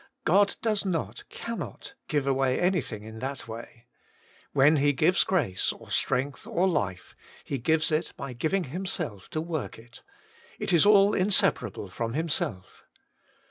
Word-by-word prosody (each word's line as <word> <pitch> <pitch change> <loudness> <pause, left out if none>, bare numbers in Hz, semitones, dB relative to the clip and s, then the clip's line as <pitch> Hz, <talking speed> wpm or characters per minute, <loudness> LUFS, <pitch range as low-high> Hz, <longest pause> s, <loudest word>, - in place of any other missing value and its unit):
God 200 +4 +4
does 215 -3 +1
not, 180 -5 -3
cannot, 230 +3 -6
give 145 -3 0
away 135 -1 +1
anything 155 - 0
in 110 0 -9
that 135 0 -5
way. 115 +1 -9 0.7
When 145 +3 +5
He 145 +1 +3
gives 170 +7 +4
grace, 140 - +1
or - - -12
strength, 130 +2 -1
or 180 +2 +1
life, 100 - -2 0.3
H^ 135 -3 -3
gives 160 +5 +2
it 155 +1 0
by 135 -2 -6
giving 160 +10 0
Himself 160 - -4
to 155 - -3
work 160 -3 -4
it 115 +2 -15 0.3
— - - -25
it - - -1
i? 170 +4 +6
all 205 0 +6
inseparable 190 +2 +2
from 115 -1 -4
Himself. 145 - -2
150 Hz, 150 wpm, -27 LUFS, 125-180 Hz, 0.7 s, i